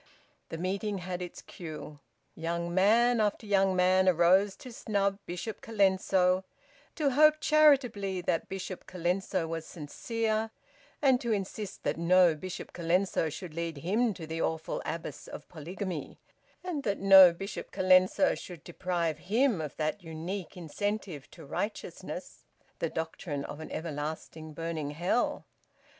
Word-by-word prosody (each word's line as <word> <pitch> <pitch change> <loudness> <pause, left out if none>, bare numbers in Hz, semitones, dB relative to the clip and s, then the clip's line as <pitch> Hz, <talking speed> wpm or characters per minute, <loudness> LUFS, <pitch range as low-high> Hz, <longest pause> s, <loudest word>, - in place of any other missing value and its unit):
The 165 - -5
meeting 195 +4 -2
had 180 0 -5
its 180 - -7
cue. 155 -3 -9 0.3
Young 170 +1 -3
man 230 +6 +4
after 210 +1 0
young 195 -2 +3
man 185 +1 +4
arose 185 +3 +4
to 255 - -11
snub 200 -3 0
Bishop 180 +5 -5
Colenso, 190 -3 +2 0.5
to 295 -4 +1
hope 305 +3 +6
charitably 265 - +3
that 165 -2 -1
Bishop 190 -1 -6
Colenso 180 0 -1
was 165 0 -4
sincere, 220 +8 -2 0.5
and 265 -3 +4
to 235 - -1
insist 200 0 -4
that - - -1
no 175 0 +5
Bishop 180 +4 -7
Colenso 175 -1 +1
should 170 +1 -8
lead 165 -1 -3
him 210 - +1
to 165 - -7
the 160 +1 -4
awful 160 0 -2
abyss 165 0 -5
of - - -9
polygamy, 175 +1 -6 0.5
and 350 -6 -3
that 200 -6 -1
no 190 -2 +9
Bishop 195 +4 -7
Colenso 185 +8 +4
should 175 -5 -9
deprive 175 -3 -2
him 230 -4 +3
of 150 -2 -6
that 155 +5 -1
unique 165 +3 -6
incentive 180 -3 -4
to 165 - -13
righteousness 205 +9 -5 0.4
the - - -1
doctrine 160 -3 -4
of 145 - -7
an 160 - -7
everlasting 155 0 -5
burning 165 -2 -3
hell. 175 +10 0
185 Hz, 140 wpm, -30 LUFS, 165-205 Hz, 0.5 s, no